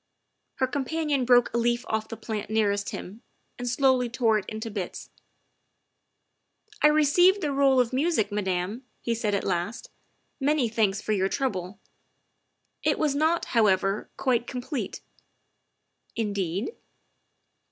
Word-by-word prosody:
Her 260 - +1
companion 285 0 -1
broke 245 -1 +4
a 235 - +1
leaf 240 +1 +1
off 220 0 -1
the 225 - -7
plant 215 -2 -5
nearest 205 -2 +1
him 210 +5 -8 0.4
and 245 0 -2
slowly 255 -1 +2
tore 225 -2 +2
it 190 - -9
into 220 +1 -5
bits. 195 -4 -6 0.8
" 420 -1 -31
I 300 - +7
received 310 +6 +4
the 300 -4 -1
roll 275 -1 +4
of 245 0 +1
music, 265 -7 +1
Madame," 195 +3 -2 0.2
he 235 - -1
said 215 -3 -1
at 200 - -1
last, 185 +5 -3 0.3
" - - -45 0.2
many 280 -3 +2
thanks 210 -3 +1
for - - -2
your 195 -2 +1
trouble. 195 -8 -3 1.0
It - - +1
was 300 -3 +1
not, 315 +4 +1
how 225 -3 +5
ever, 195 +1 +1
quite 245 -3 +1
complete." 255 +2 -4 1.1
"Indeed?" 200 - -2
235 Hz, 140 wpm, -26 LUFS, 205-275 Hz, 1.1 s, I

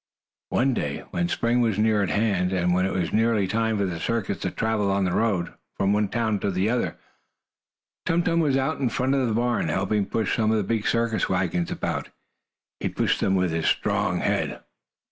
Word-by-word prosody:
One 135 +1 +2
day, - - -3
when 175 -1 -1
spring 120 -3 +1
was 110 -4 +1
near 105 -1 +3
at 100 - 0
hand, 95 0 +1
and 90 -1 +1
when 90 +1 +2
it - - -3
was 90 -3 -2
nearly 110 -3 +2
time 110 +1 0
for 100 - +1
the 90 -3 -3
circus 110 -1 -2
to 90 - -2
travel 110 0 0
on 100 0 +1
the 90 - 0
road, 100 -7 0 0.2
from 100 +1 +2
one 105 0 +2
town 110 -2 0
to - - -2
another, 100 +6 0 1.1
Tum 170 +1 +2
Tum 170 -1 +1
was 145 -5 +2
out 135 +3 -1
in 130 -3 +1
front 130 +4 0
of 135 -2 +1
the 110 - 0
barn, 120 -5 +1
helping 100 +4 0
push 110 0 0
some 110 -2 +1
of 110 - +2
the 105 - +1
big 110 +2 -1
circus 115 -1 +1
wagons 90 -2 0
about. - - -3 0.7
He - - -1
pushed - - 0
them 95 - +1
with 90 -2 +1
his 80 0 -1
strong - - +1
head. - - -1
110 Hz, 205 wpm, -25 LUFS, 95-115 Hz, 1.1 s, near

